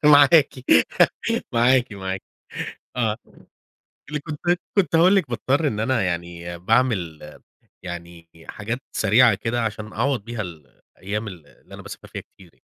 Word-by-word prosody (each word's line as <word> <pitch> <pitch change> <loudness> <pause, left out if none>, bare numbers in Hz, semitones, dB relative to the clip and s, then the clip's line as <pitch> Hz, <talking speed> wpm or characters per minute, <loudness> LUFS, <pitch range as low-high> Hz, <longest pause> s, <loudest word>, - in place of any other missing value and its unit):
معاكِ، 145 +1 +7 1.0
معاكِ 120 0 +4
معاكِ. 95 -1 -4 0.7
آه، 110 -3 0 0.9
اللي 150 - -2
كنت 150 0 -7 0.4
كنت 180 -4 +3
هاقول 180 +4 +6
لِك 185 -9 +1
باضطر 140 +5 +1
إن 105 -5 -2
أنا 120 +1 +1
يعني 85 -1 -4
باعمل 95 -7 +1 0.6
يعني 85 -1 -8 0.2
حاجات 115 +5 -4
سريعة 110 +2 +5
كده، 115 +4 -2
عشان 110 -1 -4
أعوض 125 -1 0
بيها 120 -2 -4
ال 80 -7 -8 0.3
الأيام 105 +4 -4
ال 85 -7 -10
اللي - - -20
أنا - - -10
باسافر - - -10
فيها - - -7
كتير - - -36
يعني. - - -31
110 Hz, 140 wpm, -23 LUFS, 95-130 Hz, 1.0 s, معاكِ